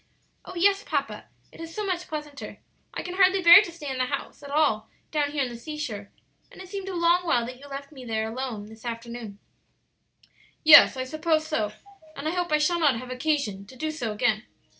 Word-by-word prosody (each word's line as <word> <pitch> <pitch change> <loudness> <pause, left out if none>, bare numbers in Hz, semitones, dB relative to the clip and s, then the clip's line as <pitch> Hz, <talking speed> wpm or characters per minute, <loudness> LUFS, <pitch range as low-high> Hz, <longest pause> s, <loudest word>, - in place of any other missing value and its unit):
"Oh, 370 - -9
yes, 395 +3 +3
papa; - - -3 0.3
it - - -13
is 330 0 -8
so 425 - -3
much 360 -2 -2
pleasanter! 300 -2 -7 0.3
I - - -5
can 360 - -6
hardly 385 0 +5
bear 340 +3 +10
to 360 - -6
stay 330 -3 -9
in 265 -1 -3
the 255 - +2
house 280 +3 -5
at 285 - -10
all 285 -7 +1 0.2
down 295 -2 +1
here 290 -2 0
at 255 - -3
the 240 - -8
seashore; 235 -6 -6 0.4
and - - -15
it 375 -1 -10
seemed 390 -1 -5
a 375 - -5
long 345 +1 +3
while 245 -9 +1
that 250 +1 -8
you 285 - -12
left 280 +1 -8
me 265 -4 -11
alone 225 0 -3
there - - -14
this 220 0 -14
afternoon." 235 -3 -6 1.3
"Yes, 295 -3 +9
I 260 - -1
suppose 310 +3 0
so: 215 -9 -2 0.4
and 280 +2 -5
I - - +1
hope 355 -1 -2
I 305 - +4
shall 345 +3 +1
not 290 -7 +3
have 255 +2 -8
occasion 255 -8 -2
to 260 - -14
do 310 +5 -3
so 245 -8 -4
again. 215 +1 0
285 Hz, 220 wpm, -26 LUFS, 240-330 Hz, 1.3 s, bear